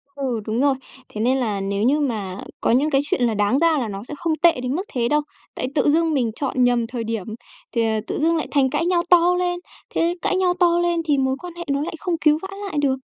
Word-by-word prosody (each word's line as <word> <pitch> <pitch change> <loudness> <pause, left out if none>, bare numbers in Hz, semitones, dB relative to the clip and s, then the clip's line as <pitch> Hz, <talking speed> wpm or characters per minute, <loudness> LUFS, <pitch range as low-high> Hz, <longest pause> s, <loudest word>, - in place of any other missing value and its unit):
Ừ, 260 -5 -2
đúng 220 +2 -1
rồi, 280 0 +3 0.3
thế 210 - -7
nên 250 +4 +2
là 215 -6 -1
nếu 200 +1 -2
như 275 +6 +3
mà 210 -9 -2 0.2
có - - +1
những 270 +6 +3
cái 275 -2 +3
chuyện 290 - -1
là 235 -2 +2
đáng 210 +5 +2
ra 330 -1 +3
là 240 -5 -2
nó 195 -1 -6
sẽ 250 - -8
không 320 0 0
tệ 335 -7 +5
đến 250 +1 -2
mức 365 - -1
thế 235 -2 +1
đâu. 300 +2 +2 0.3
Tại 255 - -3
tự 295 - +3
dưng 325 +1 +2
mình 245 -5 +1
chọn 260 -3 0
nhầm 245 -1 +2
thời 235 -1 -5
điểm 225 -4 -3 0.5
thì, 230 - +1
ờ, 220 -1 0
tự - - -3
dưng 330 +2 +2
lại 320 - -2
thành 275 -2 +2
cãi 300 +4 0
nhau 350 -1 +2
to 355 0 +6
lên, 355 -1 -1 0.3
thế 340 +1 +1
cãi - - +1
nhau 365 -1 +2
to 345 -1 +4
lên 345 -1 +1
thì 295 -3 +2
mối 265 0 +1
quan 355 +1 -8
hệ 345 - -5
nó 280 0 +1
lại 325 - -4
không 355 +1 -2
cứu 305 -1 +5
vãn 385 +1 -7
lại 385 - -5
được. 270 -2 +1
280 Hz, 270 wpm, -22 LUFS, 235-335 Hz, 0.5 s, to